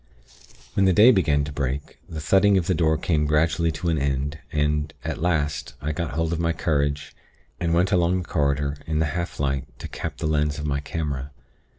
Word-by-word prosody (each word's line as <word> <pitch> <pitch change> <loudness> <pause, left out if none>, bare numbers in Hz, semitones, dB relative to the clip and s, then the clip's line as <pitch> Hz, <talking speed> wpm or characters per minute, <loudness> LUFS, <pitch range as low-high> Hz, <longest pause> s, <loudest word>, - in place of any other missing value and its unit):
"When 95 - +3
the 95 - +4
day 110 +7 +8
began 75 - +2
to 70 - -5
break, 70 0 -4
the 80 - -5
thudding 95 +6 +4
of 90 - +1
the 95 - +1
door 80 -2 +2
came 75 -2 0
gradually 80 +2 +2
to 85 +3 -2
an 80 -3 +1
end, 70 +2 -1
and, 75 0 0
at - - -3
last, 75 -4 -1
I 75 +3 -2
got 80 0 -3
hold 80 +1 0
of 85 - -2
my 85 0 +1
courage, 70 -2 -1 0.5
and 85 -2 0
went 90 +4 +2
along 90 -1 +3
the - - -16
corridor 70 -2 0
in 80 -1 -1
the 80 - +2
half 85 -1 -4
light 70 -2 0
to - - -7
cap - - -6
the - - -4
lens 75 -1 +1
of 75 - -4
my 70 -1 0
camera. 70 -2 -4
75 Hz, 210 wpm, -24 LUFS, 75-85 Hz, 0.5 s, day